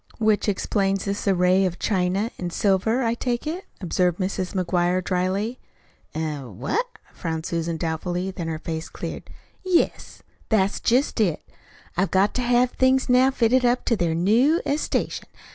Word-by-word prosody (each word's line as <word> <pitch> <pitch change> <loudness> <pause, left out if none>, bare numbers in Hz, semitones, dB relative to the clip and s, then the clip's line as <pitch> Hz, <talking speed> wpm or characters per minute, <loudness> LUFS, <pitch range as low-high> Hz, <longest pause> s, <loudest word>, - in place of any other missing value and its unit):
"Which 215 -1 +2
explains 195 -1 0
this 200 +1 -3
array 185 0 +4
of 180 -2 -1
china 195 +3 0
an' 180 - -3
silver, 205 +7 +1
I 230 -1 +1
take 240 +1 -2
it," 340 +5 -4
observed 180 -1 0
Mrs. 185 0 -3
McGuire 180 0 +1
dryly. 190 +7 -1 0.6
"Eh? 155 -2 -2
What?" 130 - -3 0.3
frowned 160 -1 -4
Susan 165 -1 -2
doubtfully; 175 +3 -2
then 175 -3 -5
her 160 -1 -2
face 160 0 -5
cleared. - - -7 0.3
"Yes, 370 -2 0 0.3
that's 200 -3 +2
jest 250 +1 +1
it. 175 -7 0 0.5
They've 190 +2 +1
got 195 +2 +2
to 250 - -1
have 245 0 +3
things 260 0 +2
now 250 +1 +5
fitted 255 -1 +2
up 245 +1 +2
to 235 - +2
their 170 -5 0
new 235 - +3
estation. 290 +2 -1
195 Hz, 155 wpm, -24 LUFS, 175-240 Hz, 0.6 s, now